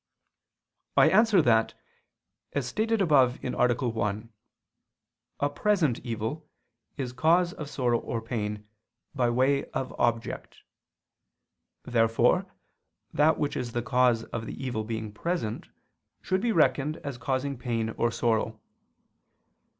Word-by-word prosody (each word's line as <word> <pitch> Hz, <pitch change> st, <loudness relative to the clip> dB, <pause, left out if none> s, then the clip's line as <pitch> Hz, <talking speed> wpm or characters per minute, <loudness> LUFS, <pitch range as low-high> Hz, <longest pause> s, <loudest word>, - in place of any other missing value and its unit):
I -, -, +6 dB
answer 215 Hz, -6 st, +5 dB
that, 115 Hz, -3 st, +3 dB, 0.8 s
As 140 Hz, -3 st, -1 dB
stated 220 Hz, -, 0 dB
above 135 Hz, -7 st, +4 dB
(A. -, -, -1 dB, 0.4 s
1), 110 Hz, -1 st, -2 dB, 1.1 s
a 145 Hz, -, +2 dB
present 165 Hz, -, +1 dB
evil, 115 Hz, +5 st, -5 dB, 0.5 s
is 130 Hz, -3 st, -4 dB
cause 170 Hz, +6 st, +3 dB
of 150 Hz, -8 st, -7 dB
sorrow 120 Hz, -4 st, +1 dB
or 115 Hz, -, -4 dB
pain, 105 Hz, -2 st, -4 dB, 0.5 s
by 125 Hz, -4 st, +1 dB
way 130 Hz, +3 st, +2 dB
of 130 Hz, -, -3 dB
object. 115 Hz, -1 st, -1 dB, 1.3 s
Therefore 115 Hz, -2 st, +2 dB, 0.7 s
that 155 Hz, +2 st, +4 dB
which 145 Hz, -, -1 dB
is 120 Hz, -2 st, -4 dB
the 120 Hz, -, -1 dB
cause 125 Hz, -2 st, +2 dB
of 115 Hz, -1 st, -6 dB
the 135 Hz, -, -6 dB
evil 115 Hz, -4 st, -2 dB
being 110 Hz, -1 st, -4 dB
present, 115 Hz, -, -3 dB, 0.6 s
should 185 Hz, 0 st, 0 dB
be 235 Hz, -, +1 dB
reckoned 155 Hz, -4 st, +2 dB
as 140 Hz, -4 st, -5 dB
causing 135 Hz, +1 st, -1 dB
pain 115 Hz, -3 st, -2 dB
or 120 Hz, -, 0 dB
sorrow. 110 Hz, -1 st, 0 dB
125 Hz, 120 wpm, -27 LUFS, 115-150 Hz, 1.3 s, I